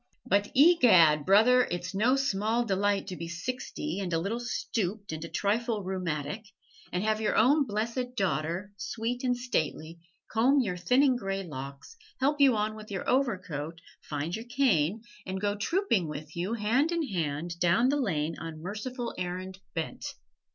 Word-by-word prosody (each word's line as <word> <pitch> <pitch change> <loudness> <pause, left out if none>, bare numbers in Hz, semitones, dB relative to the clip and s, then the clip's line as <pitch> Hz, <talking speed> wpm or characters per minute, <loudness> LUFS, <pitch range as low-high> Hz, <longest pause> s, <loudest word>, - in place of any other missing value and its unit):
But, 200 +2 +2
egad! 220 - +6
brother, 245 +6 +6
it's 175 +1 -4
no 230 +7 +3
small 230 -2 +1
delight 200 -1 +1
to 185 - -6
be 170 -1 -6
sixty 250 - -4
and 190 -3 -3
a 165 - +2
little 200 +8 -2
stooped 215 -4 -3
and 155 0 -5
a 165 - -6
trifle 215 +1 0
rheumatic, 180 0 -3 0.5
and 180 +2 -1
have 215 0 +1
your 215 - +1
own 275 +5 +4
blessed 235 +4 -2
daughter, 185 0 -1
sweet 235 +5 -3
and 250 -1 +1
stately, 165 - -2 0.3
comb 255 +6 +4
your 205 -8 0
thinning 250 +9 +3
gray 195 -3 -3
locks, 140 - -8 0.2
help 285 +2 +1
you 270 -4 +6
on 215 0 -1
with 215 0 -10
your 195 -3 -4
overcoat, 180 - -1 0.2
find 150 +3 -3
your 225 +2 -6
cane, 225 - +1 0.2
and 190 +1 -3
go 205 +1 0
trooping 220 - 0
with 150 0 -7
you, 185 +7 -1
hand 240 +9 +2
in 335 -1 0
hand, 170 - -3
down 180 +8 +3
the 285 +1 +1
lane 165 - -1
on 160 -1 -7
merciful 230 +7 -5
errand 185 +1 -4 0.2
bent. 165 -1 -4
205 Hz, 165 wpm, -29 LUFS, 175-245 Hz, 0.5 s, egad